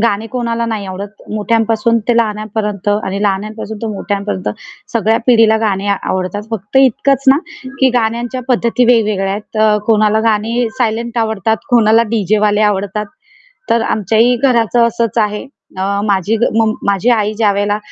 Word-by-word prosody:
गाणे 225 -1 0
कोणाला 235 -2 -2
नाही 215 -3 -3
आवडत. 195 +2 -8
मोठ्यांपासून 225 +1 +1
ते 240 - +3
लहानापर्यंत 210 -2 -2
आणि 205 -1 -1
लहानांपासून 210 +2 -3
ते - - -2
मोठ्यांपर्यंत 200 -1 -3 0.4
सगळ्या 225 0 +2
पिढीला 225 -3 +5
गाणे 200 -2 -1
आवडतात. 190 0 -2
फक्त 210 +2 -4
इतकंच 270 +1 +2
ना, 275 +2 +6 0.4
की 265 - +5
गाण्यांच्या 240 +2 -1
पद्धती 245 0 +2
वेगवेगळ्या 215 -5 +2
आहेत. 210 +2 -7
अ, 215 -1 +4
कोणाला 215 -1 +3
गाणी 230 +3 0
सायलेंट 235 0 -1
आवडतात, 220 -1 0
कोणाला 225 -1 +4
डी-जेवाले 210 0 +1
आवडतात. 205 +2 -3 0.6
तर 230 - +3
आमच्याही 225 +5 +2
घराचं 235 -2 +2
असंच 235 0 -1
आहे. 210 +2 -1 0.3
अ, - - -2 0.2
माझी 205 +1 +1 0.2
मम 220 -1 +3 0.2
माझी 200 +4 0
आई 215 -3 +1
ज्यावेळेला 205 -1 +1
220 Hz, 140 wpm, -15 LUFS, 205-230 Hz, 0.6 s, ना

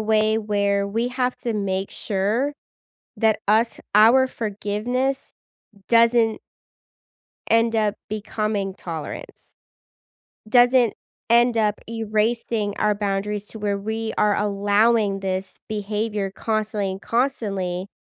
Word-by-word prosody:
way 215 0 +2
where 200 -2 0
we 230 +4 -1
have 250 0 -1
to 235 - -3
make 195 -1 -2
sure 215 +8 -1 0.7
that 220 -2 +2
us 225 +3 +2
our 235 +5 +6
forgiveness 235 +5 -2 0.6
doesn't 230 -1 +4 1.1
end 230 0 +3
up 210 -1 +1
becoming 210 -2 -2
tolerance, 165 -5 -8 0.9
doesn't 245 -1 +5 0.3
end 235 0 +4
up 210 -1 +1
erasing 220 -1 -1
our 210 -1 +2
boundaries 205 0 -2
to 220 - -10
where 205 -1 -1
we 220 +2 -3
are 210 -1 +3
allowing 205 0 +2
this 190 0 -3
behavior 210 -1 -2
constantly 215 -2 -2
and 190 +1 -7
constantly 200 -7 -1
215 Hz, 105 wpm, -23 LUFS, 200-230 Hz, 1.1 s, our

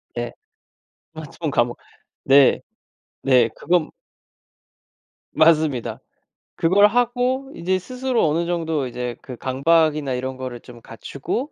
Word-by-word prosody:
네. - - -3 0.8
스마트폰 160 0 -6
감옥. 120 -2 0 0.5
네. 135 0 +5 0.6
네 125 -3 +4
그건 175 -3 0 1.4
맞습니다. 155 -5 +2 0.6
그걸 195 +5 +4
하고 245 +4 0
인제 185 +2 -1
스스로 250 0 -1
어느 165 +3 0
정도 160 -5 -2
이제 125 0 -5
그 130 - -9
강박이나 145 +2 +1
이런 130 +1 -4
거를 130 -2 -6
좀 120 0 -14
갖추고 140 - -5
155 Hz, 225 characters per minute, -21 LUFS, 130-185 Hz, 1.4 s, 네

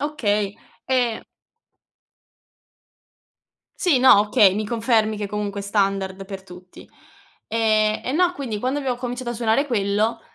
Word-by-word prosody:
Okay, 210 -9 -1 0.3
e 245 -3 0 2.6
Sì, 330 -8 +3
no, 255 -5 +7
okay, 205 -2 +4
mi 215 0 -2
confermi 220 -2 +1
che 205 - -4
comunque 205 0 -4
è - - -6
standard 195 -1 -1
per 195 -1 -8
tutti. 180 -1 -14 0.6
Ehm, 215 -1 +1
e 255 - -2
no, 355 +4 +2
quindi 240 -7 -4
quando 255 +6 -1
abbiamo 260 -3 -2
cominciato 245 0 -4
a - - -2
suonare 235 +4 +1
quello, 215 0 0
215 Hz, 135 wpm, -22 LUFS, 200-250 Hz, 2.6 s, no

